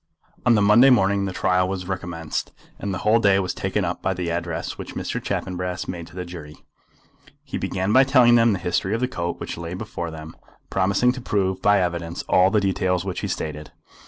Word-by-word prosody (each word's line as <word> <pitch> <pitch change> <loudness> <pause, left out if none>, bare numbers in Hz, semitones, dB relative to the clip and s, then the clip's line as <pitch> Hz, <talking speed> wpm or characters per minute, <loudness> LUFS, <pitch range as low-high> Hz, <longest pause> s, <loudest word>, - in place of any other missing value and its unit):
On 120 - +6
the 105 - +3
Monday 115 +6 +7
morning 100 -5 +3
the 95 - -3
trial 90 0 +1
was 95 -2 -4
recommenced, 85 -4 -4 0.3
and 100 - -3
the 95 - -2
whole 110 +2 +5
day 100 -3 +4
was 95 -1 -2
taken 95 0 -1
up 85 +1 -3
by 95 - -1
the 90 -1 -3
address 85 -1 -3
which - - -9
Mr. - - -3
Chaffanbrass 90 -1 -3
made 85 -2 -6
to 80 - -16
the 90 -1 -5
jury. 80 -4 -9 0.9
He - - -5
began 95 +2 -1
by 130 - +7
telling 130 -3 +5
them 115 -2 +5
the - - -1
history 90 +3 -1
of - - -2
the 125 - +1
coat 85 -8 -4
which - - -6
lay 85 +1 -5
before 85 -2 -5
them, 80 0 -9 0.4
promising 100 +6 +2
to 130 0 -7
prove 95 -5 -1
by 105 0 +4
evidence 85 -1 -3
all 90 +1 +4
the 105 +1 +2
details 95 -2 0
which 95 -2 -3
he - - -3
stated. 75 -1 -5
95 Hz, 215 wpm, -23 LUFS, 85-100 Hz, 0.9 s, Monday